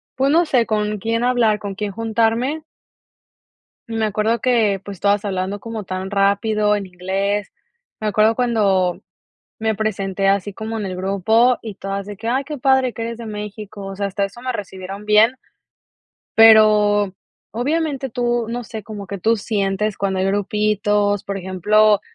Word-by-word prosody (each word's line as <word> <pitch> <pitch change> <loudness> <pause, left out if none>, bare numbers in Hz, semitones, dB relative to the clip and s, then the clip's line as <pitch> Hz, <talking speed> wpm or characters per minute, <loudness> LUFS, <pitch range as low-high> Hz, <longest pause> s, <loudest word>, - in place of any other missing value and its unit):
pues 270 +1 +2
no 340 +3 +4
sé, 250 -6 +2
con 210 -1 -1
quién 230 +3 -1
hablar, 235 -4 +2
con 200 -2 -6
quién 205 0 -3
juntarme. 230 +7 0 1.3
Me 225 -1 -1
acuerdo 215 +2 0
que, 220 -6 +2
pues, 200 -3 -8
todas 205 +1 +1
hablando 190 +1 -2
como 225 0 -6
tan 185 0 -5
rápido 210 +1 +2
en 200 -2 -4
inglés. 195 +3 -2 0.5
Me 215 - -2
acuerdo 215 +2 +3
cuando 205 -7 +1 0.6
me 220 0 0
presenté 195 -2 -1
así 200 +1 0
como 220 +2 -5
en 210 - -3
el 185 -1 -4
grupo 210 +6 +2
y 220 -3 -7
todas 195 0 -4
de 205 0 -7
que: 225 +3 -4
"Ay 265 +3 0
qué 300 +1 -5
padre 265 -1 +2
que - - -7
eres 230 0 -4
de 235 - -8
México", 210 -1 -7
o 195 0 -6
sea, 200 0 -1
hasta 200 +1 -2
eso 200 +5 -5
me 255 0 -3
recibieron 195 -1 -7
bien 215 +3 +5 1.0
pero 210 -3 +6 0.4
obviamente 280 +2 -1
tú, 240 -1 -1
no 240 +1 -3
sé, 220 -2 -7
como 205 -1 -8
que 200 - -5
tú 225 +5 +2
sientes 205 0 -1
cuando 195 -1 -1
hay 190 - +1
grupitos, 205 0 +1
por 200 -1 -4
ejemplo, 205 +3 +3
210 Hz, 170 wpm, -20 LUFS, 200-230 Hz, 1.3 s, pero